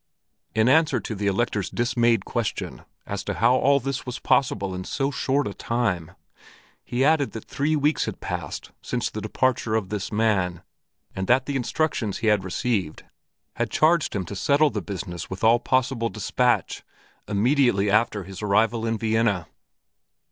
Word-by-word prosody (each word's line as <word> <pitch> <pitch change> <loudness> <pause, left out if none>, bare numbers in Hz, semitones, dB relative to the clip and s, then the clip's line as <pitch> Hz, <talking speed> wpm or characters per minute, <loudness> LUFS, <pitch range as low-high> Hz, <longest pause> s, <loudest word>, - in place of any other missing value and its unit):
In 110 +1 +3
answer 150 -2 +4
to 110 - -5
the 100 0 -2
Elector's 100 -1 0
dismayed 120 -3 +1
question 120 -3 -3 0.2
as 100 -1 -4
to 100 - -2
how 105 +8 +4
all 140 +2 +4
this 135 +1 -3
was 125 -1 -5
possible 100 -7 +1
in 90 0 -4
so 135 +7 -1
short 135 +2 0
a 100 - -4
time, 100 -10 -2 0.7
he 125 +2 0
added 145 -8 +2
that 110 - -7
three 150 +3 0
weeks 150 +1 +1
had - - -5
passed - - -5
since - - -2
the - - -5
departure 125 -4 0
of 105 -4 -1
this 105 -2 -4
man 100 -5 +1 0.5
and 95 0 -3
that 125 +1 +3
the 140 - -3
instructions 130 -5 -1
he 110 - -2
had 100 -3 -1
received 95 -3 -2 0.5
had - - 0
charged 165 -3 +2
him 95 -3 -2
to 100 - -7
settle 145 +9 +3
the 105 - -3
business 85 -3 -6
with 95 +2 -7
all 115 +2 +5
possible 130 -2 0
dispatch 120 +4 0 0.5
immediately 105 -2 +2
after 105 -2 +2
his 95 +1 -9
arrival 110 +3 +2
in 115 0 0
Vienna. 110 -5 +1
115 Hz, 165 wpm, -24 LUFS, 100-130 Hz, 0.7 s, all